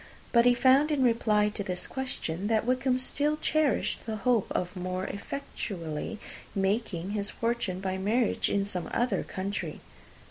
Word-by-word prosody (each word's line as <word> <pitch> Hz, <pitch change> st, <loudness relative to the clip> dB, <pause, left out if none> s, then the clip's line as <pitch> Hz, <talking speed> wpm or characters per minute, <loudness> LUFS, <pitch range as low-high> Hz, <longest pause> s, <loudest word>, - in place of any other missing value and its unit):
But 235 Hz, 0 st, +5 dB
he 245 Hz, -, +6 dB
found, 270 Hz, +4 st, +5 dB
in 290 Hz, -4 st, +2 dB
reply 215 Hz, -3 st, +3 dB
to 210 Hz, -1 st, -4 dB
this 180 Hz, -2 st, -2 dB
question, 205 Hz, -8 st, -3 dB
that 220 Hz, 0 st, +2 dB
Wickham 255 Hz, +1 st, +2 dB
still 290 Hz, +4 st, +1 dB
cherished 285 Hz, -11 st, +1 dB
the 220 Hz, -, -2 dB
hope 235 Hz, -1 st, +2 dB
of 180 Hz, +2 st, -2 dB
more 185 Hz, +1 st, -3 dB
effectually 200 Hz, -, -5 dB, 0.4 s
making 195 Hz, -2 st, 0 dB
his 205 Hz, -1 st, -2 dB
fortune 230 Hz, -6 st, -1 dB
by 190 Hz, 0 st, -2 dB
marriage, 220 Hz, +4 st, +1 dB
in 200 Hz, -1 st, +1 dB
some 185 Hz, -3 st, -3 dB
other 245 Hz, +1 st, +1 dB
country. 195 Hz, +2 st, -4 dB
215 Hz, 150 wpm, -29 LUFS, 190-250 Hz, 0.4 s, he